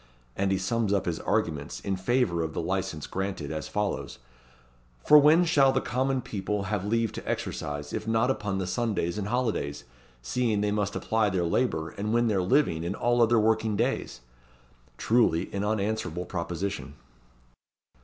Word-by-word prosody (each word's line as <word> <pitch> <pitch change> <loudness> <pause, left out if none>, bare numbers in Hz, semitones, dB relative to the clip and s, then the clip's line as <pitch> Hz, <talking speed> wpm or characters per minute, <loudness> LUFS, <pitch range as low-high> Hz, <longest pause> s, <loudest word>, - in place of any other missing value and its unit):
And 95 0 0
he 95 - +2
sums 105 +3 0
up 100 - +1
his 85 -2 -2
arguments, 75 -4 -1
in 100 - -2
favour 95 -2 +1
of 80 -1 -3
the - - -1
license 75 -2 -2
granted, 95 -6 -4
as 80 0 -4
follows: 105 -1 -3 0.9
"For 150 - +9
when 155 +5 +5
shall 140 -5 +4
the 130 - +1
common 130 +1 -1
people 100 0 -3
have 100 0 -2
leave 115 +2 0
to - - -7
exercise, 75 0 -4
if 110 - -4
not 115 +3 +2
upon 105 -6 -2
the 95 - -2
Sundays 105 -3 -1
and 100 - -3
holidays, 110 - -1 0.4
seeing 110 - 0
they 105 0 +1
must 105 -1 -1
apply 110 -2 +1
their 90 -3 0
labour, 85 -3 0
and 105 +2 -4
win 120 -1 +3
their 100 -3 +1
living 90 - +2
in 90 +4 -2
all 120 +1 +1
working 110 -1 +2
days?" 115 - -1 0.8
Truly, 110 -7 +2
an 100 0 -1
unanswerable 105 -4 -1
proposition. 90 +3 -4
105 Hz, 165 wpm, -27 LUFS, 90-115 Hz, 0.9 s, For